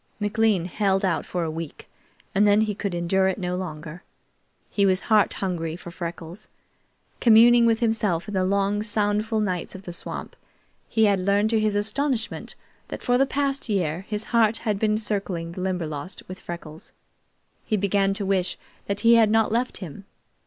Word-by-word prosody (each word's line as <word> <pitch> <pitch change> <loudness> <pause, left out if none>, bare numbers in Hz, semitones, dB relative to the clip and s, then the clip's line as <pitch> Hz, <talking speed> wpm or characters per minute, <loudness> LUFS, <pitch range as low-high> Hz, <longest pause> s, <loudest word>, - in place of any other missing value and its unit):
McLean 210 -3 +1
held 195 +1 0
out 175 -3 -1
for 175 -1 -2
a 160 - -2
week, 160 -1 -7 0.5
and 205 +2 +4
then 205 +1 +5
he 215 -1 0
could 200 -2 -3
endure 190 +3 +1
it 190 - 0
no 180 -2 -2
longer. 160 -2 -6 0.7
He 200 - 0
was 190 -1 +3
heart 215 -2 +3
hungry 165 -4 -3
for 175 0 -10
Freckles. 170 +1 -7 0.7
Communing 235 +1 +6
with 225 0 +2
himself 220 -7 +1
in 205 - -6
the 190 -1 +1
long, 200 +2 +1
soundful 215 +1 0
nights 185 -5 -2
of 190 - -9
the 175 - -7
swamp, - - -6 0.5
he 220 -1 +3
had 200 -2 +3
learned 200 +3 +2
to 225 - +3
his 215 -1 +1
astonishment 220 +3 -1 0.3
that - - -7
for 245 0 +2
the 270 - +4
past 275 -2 -1
year 175 -5 0
his 210 0 -2
heart 225 -1 +4
had 210 -3 0
been 215 0 +2
circling 195 -6 -2
the 185 - -7
Limberlost 175 -3 -4
with 185 0 -8
Freckles. 165 -2 -9 0.7
He 215 - 0
began 195 0 +1
to 200 -1 -3
wish 190 -2 0 0.3
that 200 0 -2
he 235 0 +6
had 220 -2 +5
not 220 0 +2
left 240 +3 0
him. 185 +5 -11
200 Hz, 180 wpm, -24 LUFS, 180-220 Hz, 0.7 s, Communing